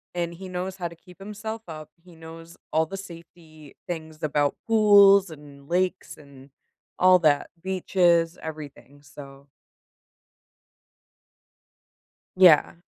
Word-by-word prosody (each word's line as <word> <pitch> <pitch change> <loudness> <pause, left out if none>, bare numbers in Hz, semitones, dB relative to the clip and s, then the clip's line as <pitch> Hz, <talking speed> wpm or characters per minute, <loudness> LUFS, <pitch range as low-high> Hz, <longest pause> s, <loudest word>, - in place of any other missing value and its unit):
and 170 -1 -3
he 190 +3 -10
knows 185 +1 -6
how 175 -2 -4
to 170 - -13
keep 180 +2 -19
himself 210 +2 -8
up, 155 -2 -10
he 175 -1 -18
knows 165 +1 -13 0.2
all 160 +1 +1
the 195 - -8
safety 165 -5 -14
things 160 -2 -8
about 145 -1 0
pools, 200 -3 +5
and 145 -3 -14
lakes, 180 +2 -2
and 140 -2 -17 0.5
all 185 0 +5
that 150 -4 +1
beaches, 175 -3 0
everything, 145 -2 -10
so 140 -1 -14 2.9
Yeah. 175 -5 +5
170 Hz, 115 wpm, -24 LUFS, 155-185 Hz, 2.9 s, pools